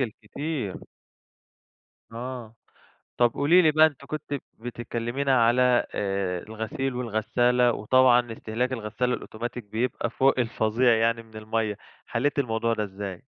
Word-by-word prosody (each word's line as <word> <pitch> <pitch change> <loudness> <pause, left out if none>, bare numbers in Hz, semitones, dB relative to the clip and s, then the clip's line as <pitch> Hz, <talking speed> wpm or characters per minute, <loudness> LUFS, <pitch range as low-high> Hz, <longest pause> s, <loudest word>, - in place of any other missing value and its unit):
الكتير. 125 - -4 1.4
آه، 120 -1 -7 0.6
طَب 120 -1 +3
قولي 165 +6 +5
لي 155 -3 +4
بقى، 155 +1 +6
أنتِ 140 -3 -3
كنتِ 150 0 -5 0.3
بتكلمينا 120 +2 0
على، 125 +1 +4
آآ، 95 -3 -1
الغسيل 110 +4 -4
والغسالة، 120 +1 +2
وطبعًا 120 +1 +3
استهلاك 115 +4 -2
الغسالة 120 +2 -2
الأوتوماتيك 120 +2 -5
بيبقى 115 +3 -2
فوق 130 +2 +2
الفظيع 115 +1 +2
يعني 115 +1 +1
من 110 -1 -19
المَيَّة، 110 -1 -2 0.3
حليتِ 140 +4 0
الموضوع 115 -2 0
ده 105 -2 -1
إزاي؟ 95 -2 -7
120 Hz, 120 wpm, -26 LUFS, 110-130 Hz, 1.4 s, بقى